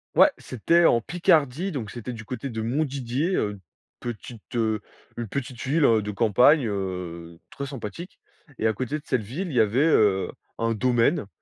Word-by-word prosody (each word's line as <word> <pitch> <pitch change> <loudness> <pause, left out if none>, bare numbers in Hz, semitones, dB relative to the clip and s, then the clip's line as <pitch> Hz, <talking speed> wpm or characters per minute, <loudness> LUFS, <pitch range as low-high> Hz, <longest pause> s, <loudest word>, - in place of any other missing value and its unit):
Ouais, - - +7
c'était 170 +8 +1
en 120 - +5
Picardie, 160 - +1
donc 125 - -4
c'était 120 +2 -6
du 115 -2 -8
côté 125 +2 -5
de 110 -2 -4
Montdidier, 135 +5 -1
heu, 105 -1 -2 0.4
petite, 120 -1 -7
heu, 110 -3 0 0.3
une 120 -2 -5
petite 130 -1 -5
ville, 145 +3 +3
heu, 110 -3 +4
de 105 0 -4
campagne, 125 +7 +4
heu, 90 -4 -5
très 140 - -6
sympathique 135 - -8 0.4
et 110 - +2
à 110 - +2
côté 130 +6 -3
de - - -20
cette 130 -3 0
ville, 145 - -4
il 155 - -6
y 120 - +6
avait, 110 +4 +2
heu, 105 -11 +3 0.3
un 115 0 0
domaine. 120 - +2
120 Hz, 180 wpm, -25 LUFS, 110-140 Hz, 0.4 s, Ouais